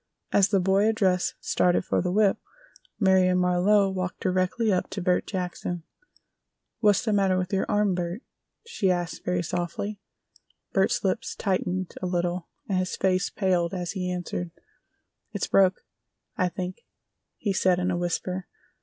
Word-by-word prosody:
As 195 -2 +5
the 195 -1 +2
boy 195 +3 +3
addressed 190 -5 +1
started 180 0 +2
for - - +1
the 180 0 -1
whip 205 0 +3 0.6
Marion 190 -2 +4
Marlowe 180 +3 +3
walked 185 -1 -3
directly 185 +4 +1
up 180 - -1
to 200 - -5
Bert 180 0 +1
Jackson. 180 -2 -4 1.0
"What's 210 0 +3
the 215 - +1
matter 195 -2 +3
with 185 +1 -2
your 190 - +1
arm, 210 -2 +2
Bert?" 175 +5 -3 0.4
she 235 - 0
asked 175 -1 -1
very 180 -1 0
softly. 180 +4 -3 0.7
Bert's - - +2
lips - - -1
tightened 185 -2 -1
a 185 - -1
little 175 0 -1 0.2
and 190 -2 +1
his 185 0 -2
face 185 -1 +1
paled 180 -3 0
as 175 -2 -3
he 180 -2 -3
answered: 175 -1 -3 0.8
"It's - - -1
broke, 190 -1 +3 0.5
I 185 -2 +1
think," 185 0 -5 0.6
he 200 - -1
said 185 -1 +3
in 180 +1 0
a 175 - 0
whisper. 180 +1 -2
185 Hz, 155 wpm, -26 LUFS, 180-195 Hz, 1.0 s, As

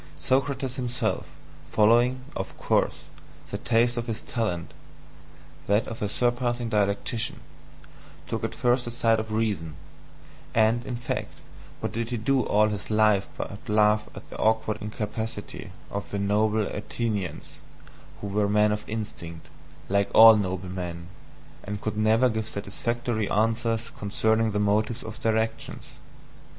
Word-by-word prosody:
Socrates 130 - 0
himself, 125 -1 -1 0.4
following, 120 +4 +4
of - - -5
course, - - +1 0.5
the - - -3
taste 120 +1 +2
of 120 0 -2
his 115 -1 -3
talent 90 -8 -3 0.9
that 105 +2 +3
of 115 - -7
a 105 - 0
surpassing 120 +1 0
dialectician 105 +2 0 0.9
took - - -2
first 125 0 +2
the - - -3
side 115 -2 +2
of 110 0 -5
reason; 105 -8 -1 0.8
and, 115 +1 +3
in 125 - -2
fact, 120 0 -4 0.5
what - - -2
did 115 0 -3
he 120 - -1
do 130 +4 +2
all 105 -2 +3
his 105 -3 -5
life 105 -2 +3
but 105 +4 -6
laugh 105 0 +3
at - - -10
the - - -8
awkward 110 -1 +1
incapacity 105 +1 -5 0.2
of 100 0 -4
the 100 - -3
noble 105 +2 +2
Athenians, 105 -3 -4 0.6
who 100 - -3
were 100 +1 +1
men 105 0 +4
of 105 0 -2
instinct, 85 -7 -6 0.4
like 100 +1 +2
all 115 0 +11
noble 95 -3 -2
men, 85 -2 -5 0.5
and 105 0 -4
could 110 0 -3
never 110 +4 +4
give 110 -2 -2
satisfactory 110 +2 -2
answers 115 +1 +1
concerning 110 +2 +1
the 105 -1 -1
motives 105 +3 +1
of 110 -1 -8
their 110 -1 +2
actions? 110 0 -3
110 Hz, 140 wpm, -26 LUFS, 105-115 Hz, 0.9 s, all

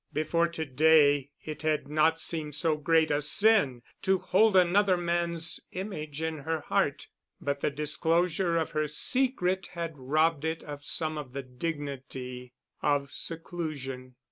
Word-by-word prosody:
Before 160 +3 +1
to 165 -1 -4
day 145 -1 +4 0.2
it 155 -1 -6
had 155 -2 0
not 155 +2 +2
seemed 155 -3 -2
so 155 +1 +2
great 160 +1 +2
a 145 0 +1
sin 150 - +4 0.2
to 190 -1 +2
hold 200 +2 +3
another 185 +1 +4
man's 170 -1 0
image 160 -6 -5
in 160 -1 -3
her 160 +2 -3
heart, - - 0 0.3
but 140 0 -2
the - - +1
disclosure 165 +4 0
of 160 - -1
her 155 0 0
secret 190 - 0
had 170 -2 -4
robbed 155 +3 +1
it 160 0 -2
of 145 -1 -8
some 155 0 -1
of 130 -4 -9
the 140 0 -4
dignity 130 -3 -6 0.3
of 140 -1 0
seclusion. 145 -7 -4
155 Hz, 145 wpm, -28 LUFS, 145-170 Hz, 0.3 s, day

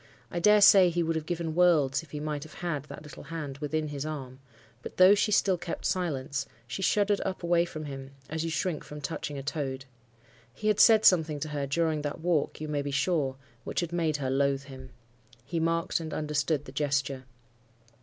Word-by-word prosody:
I 175 - -2
dare 210 +4 +5
say 195 -2 +8
he 170 0 0
would 165 0 -1
have 160 -1 -3
given 170 -2 -2
worlds 155 -6 +3
if 165 - -16
he 150 - -6
might 150 -1 -3
have 155 +1 -11
had 150 -5 -3
that 150 - -10
little 150 -1 -11
hand 145 -3 -6
within 155 +1 -2
his 140 -1 -4
arm; 135 -4 -6 0.4
but, - - -9
though 185 +2 +8
she 210 +1 +1
still 190 -3 +3
kept 170 0 -5
silence, 140 -7 -1 0.2
she 130 +10 -5
shuddered 205 +1 +2
up 190 -2 -4
away 170 0 +3
from 155 -3 -7
him, 135 -1 -8
as 160 +1 -3
you 165 - -2
shrink 165 0 -2
from 150 - -9
touching 145 -1 -4
a 135 - -5
toad. 135 -2 -3 0.7
He 215 - -1
had 210 - +2
said 220 -2 +7
something 160 -5 +4
to 155 - -3
her 145 -2 -3
during 155 +1 0
that 145 +1 -4
walk, 165 -3 0
you 155 - -5
may 150 -1 -1
be 140 - -4
sure, 140 -1 0 0.3
which - - -2
had 175 -1 -4
made 160 -3 0
her 135 -2 -2
loathe 140 0 +1
him. 130 -2 -11 0.6
He 170 +3 -2
marked 165 +2 0
and 160 -1 -5
understood 150 -1 -1
the 130 - -9
gesture. 135 -2 -1
155 Hz, 210 wpm, -28 LUFS, 140-170 Hz, 0.7 s, say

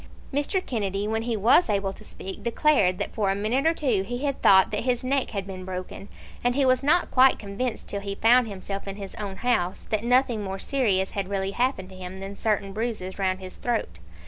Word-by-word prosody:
Mr. 290 +7 0
Kennedy, 205 -4 -2
when 220 +1 0
he 230 -1 -2
was 230 - +5
able 195 -2 0
to - - -14
speak, 190 0 -8
declared 235 -7 +2
that - - -4
for 205 -3 0
a 195 - +1
minute 230 +9 +1
or 325 - +4
two 250 -11 +1
he 245 +8 -4
had 275 -2 -2
thought 190 -1 +6
that 210 - -1
his 250 -1 0
neck 270 +1 0
had 200 -3 -4
been 190 -1 -7
broken; 185 +1 -6 0.4
and 245 0 +2
he 275 -1 +3
was 255 -1 +3
not 315 +6 +2
quite 260 0 +6
convinced 215 +3 -4
till 200 - -4
he 200 0 -4
found 240 +3 +5
himself 195 0 -6
in 195 - -4
his 200 -2 -8
own 200 -2 -4
house, 195 -6 0
that 215 0 0
nothing 245 -3 +2
more 195 -1 -4
serious 195 -5 0
had 200 -2 -3
really 195 -1 -1
happened 240 -5 -1
to 190 - -12
him 185 0 -8
than 195 +1 -7
certain 200 -2 -1
bruises 210 -4 -4
round 185 -1 0
his 185 0 -9
throat. 220 - -2
210 Hz, 225 wpm, -25 LUFS, 195-245 Hz, 0.4 s, thought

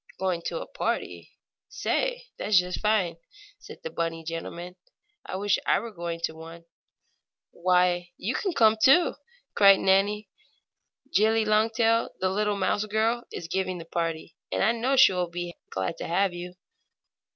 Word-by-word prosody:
"Going 185 -3 -1
to - - -3
a - - -6
party? - - -4 0.4
Say, - - -1
that's 205 -1 +2
just 180 0 -3
fine!" 205 -6 +1 0.4
said - - -12
the 485 - -5
bunny 165 -1 -3
gentleman. 170 +2 -6 0.5
"I - - -5
wish 200 +1 +1
I - - +3
were 230 - -7
going 170 -3 -5
to 160 - -2
one." 165 +1 -11 0.9
"Why, 180 0 +1
you 220 +7 -2
can 380 +6 -2
come, 220 -5 +4
too!" 330 +6 +6 0.4
cried 195 -1 +6
Nannie. 200 +2 +2 0.9
"Jillie 220 +2 +3
Longtail, 225 +2 +2
the 185 - +1
little 210 +1 0
mouse 200 +2 0
girl, 225 +3 0
is 165 - -6
giving 185 +1 -2
the 165 - -9
party, 165 -1 -3 0.2
and - - 0
I 215 - +4
know 240 +4 0
she 260 -7 +7
will 180 -1 -1
be 175 0 -5 0.2
glad 95 0 -3
to - - -5
have 185 +2 +1
you." 175 +1 -8
190 Hz, 160 wpm, -26 LUFS, 175-220 Hz, 0.9 s, she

